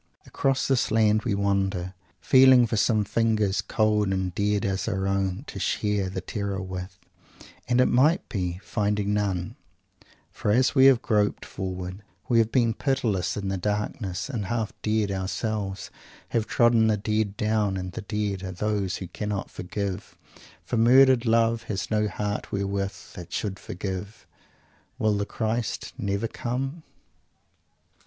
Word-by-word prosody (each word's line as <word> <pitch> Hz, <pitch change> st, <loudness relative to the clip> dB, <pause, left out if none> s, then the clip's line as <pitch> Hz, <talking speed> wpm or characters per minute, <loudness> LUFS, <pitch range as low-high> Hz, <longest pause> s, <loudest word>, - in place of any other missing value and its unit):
Across 135 Hz, -1 st, 0 dB
this 135 Hz, -3 st, +2 dB
Land 110 Hz, -1 st, +3 dB
we 110 Hz, -5 st, +1 dB
wander, 95 Hz, -2 st, 0 dB, 0.3 s
feeling 130 Hz, -2 st, +6 dB
for 115 Hz, -, -2 dB
some 110 Hz, 0 st, +2 dB
fingers, 110 Hz, -2 st, +1 dB
cold 105 Hz, -2 st, +1 dB
and 95 Hz, -2 st, -1 dB
dead 105 Hz, +1 st, 0 dB
as 95 Hz, +1 st, -1 dB
our 95 Hz, -3 st, -1 dB
own, 100 Hz, +2 st, -1 dB
to 100 Hz, -, -7 dB
share 105 Hz, 0 st, 0 dB
that 95 Hz, -1 st, -5 dB
terror 100 Hz, -1 st, -3 dB
with, 95 Hz, 0 st, -6 dB, 0.7 s
and, 120 Hz, 0 st, +2 dB
it 125 Hz, -, +6 dB
may 150 Hz, +8 st, +4 dB
be, 90 Hz, -3 st, -3 dB
finding 105 Hz, -1 st, 0 dB
none, 95 Hz, -4 st, -1 dB, 0.7 s
for -, -, -3 dB
as 125 Hz, +5 st, +3 dB
we 135 Hz, -1 st, +7 dB
have 130 Hz, -2 st, +5 dB
groped 105 Hz, -2 st, +1 dB
forward 95 Hz, 0 st, -5 dB, 0.3 s
we 120 Hz, -2 st, +4 dB
have 115 Hz, 0 st, +2 dB
been 115 Hz, -2 st, +3 dB
pitiless 115 Hz, -, -1 dB
in 100 Hz, -1 st, -3 dB
the 95 Hz, -1 st, -2 dB
darkness, 105 Hz, -2 st, -2 dB
and, 120 Hz, -8 st, -3 dB
half 115 Hz, -1 st, -2 dB
dead 105 Hz, -2 st, 0 dB
ourselves, 95 Hz, +1 st, -3 dB, 0.4 s
have 110 Hz, -1 st, 0 dB
trodden 120 Hz, -2 st, +4 dB
the 110 Hz, -1 st, +2 dB
dead 105 Hz, 0 st, -1 dB
down, 105 Hz, -2 st, +1 dB
and 90 Hz, 0 st, -4 dB
the -, -, -6 dB
dead 105 Hz, -2 st, -2 dB
are 95 Hz, -1 st, -5 dB
those 100 Hz, -1 st, -1 dB
who 95 Hz, -, -6 dB
cannot 105 Hz, +2 st, -4 dB
forgive; 95 Hz, +1 st, -5 dB, 0.5 s
for 120 Hz, -, -2 dB
murdered 125 Hz, +1 st, +6 dB
"love" 115 Hz, 0 st, +3 dB
has 100 Hz, 0 st, -3 dB
no 105 Hz, 0 st, +2 dB
heart 105 Hz, 0 st, -3 dB
wherewith 100 Hz, 0 st, -2 dB, 0.2 s
it 90 Hz, 0 st, -10 dB
should 100 Hz, -2 st, -3 dB
forgive: 95 Hz, +3 st, -6 dB, 0.7 s
_Will 110 Hz, -1 st, +2 dB
the 100 Hz, 0 st, -2 dB
Christ 115 Hz, +1 st, -2 dB
never 100 Hz, +3 st, -1 dB
come? 135 Hz, +8 st, -4 dB
105 Hz, 150 wpm, -26 LUFS, 95-115 Hz, 0.7 s, we